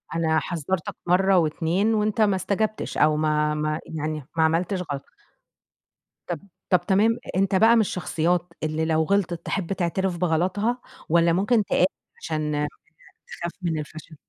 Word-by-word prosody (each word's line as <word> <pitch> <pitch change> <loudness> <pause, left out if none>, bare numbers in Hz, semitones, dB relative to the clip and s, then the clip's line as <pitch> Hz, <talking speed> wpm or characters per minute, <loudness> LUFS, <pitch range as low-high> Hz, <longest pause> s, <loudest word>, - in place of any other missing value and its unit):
أنا 160 -1 +2
حذرتك 175 +1 -3
مرة 190 +1 +4
و2 170 +6 +1
وأنت 215 0 +1
ما 205 -2 +4
استجابتش 210 +3 -2
أو 150 0 +4
ما 150 0 +1
ما 155 +1 -1
يعني 155 -3 -4
ما 160 - +4
عملتش 170 +4 +1
غلط. 140 -1 -4 1.2
طب 175 -3 -3 0.3
طب 180 -2 +5
تمام 215 +4 +3 0.2
أنت 195 0 +2
بقى 225 +4 +6
من 230 - +5
الشخصيات 175 -2 -1
اللي 155 +1 -1
لو 160 0 +2
غلطت، 180 -2 0
تِحب 195 -1 -2
تَعترف 185 0 -1
بغلطها 185 +8 0 0.3
والّا 170 0 +4
ممكن 205 +5 +2
تقاوح 180 - +2 0.4
عشان 150 -2 -1 0.6
تخاف 170 0 -5
من 165 -3 -1
الفشل؟ 155 +1 -9
170 Hz, 145 wpm, -24 LUFS, 155-195 Hz, 1.2 s, بقى